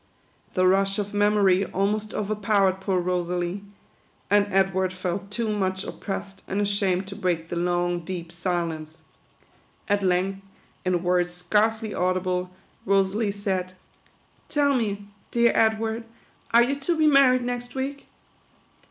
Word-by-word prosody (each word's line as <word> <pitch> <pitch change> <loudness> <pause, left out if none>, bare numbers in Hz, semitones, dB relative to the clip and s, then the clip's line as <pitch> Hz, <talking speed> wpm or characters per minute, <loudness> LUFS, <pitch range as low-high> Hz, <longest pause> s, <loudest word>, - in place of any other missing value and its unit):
The 185 - +3
rush 195 +1 +3
of 205 -1 -3
mem 205 +1 +3
ory 195 -1 +4
almost 210 +3 -1
overpowered 200 -2 +1
poor 190 -1 +1
Rosalie; 180 +1 -2 0.7
and 205 0 +4
Edward 190 -1 +2
felt 185 +2 -4
too 215 0 -1
much 190 -1 -1
oppressed 195 -1 -6
and 195 - -2
ashamed 200 -2 +1
to 195 +1 -8
break 175 -5 -1
the - - -3
long, 175 0 0
deep 170 -1 -6
silence. 170 -3 -3 0.8
At 205 0 +2
length, 190 +1 0 0.4
in 180 -1 0
words 180 0 +2
scarcely 210 +5 0
au 185 0 +1
dible, 180 0 -1 0.3
Rosalie 195 +2 +2
said, 190 -2 -2 0.4
" - - -37
Tell 285 -2 +2
me, 205 -5 -1 0.2
dear 235 0 +3
Edward, 220 +1 +1 0.5
are 235 +1 +7
you 270 +4 0
to 330 +4 0
be 315 - +3
married 275 -4 +5
next 245 0 -4
week 275 +1 -4
195 Hz, 140 wpm, -25 LUFS, 180-215 Hz, 0.8 s, are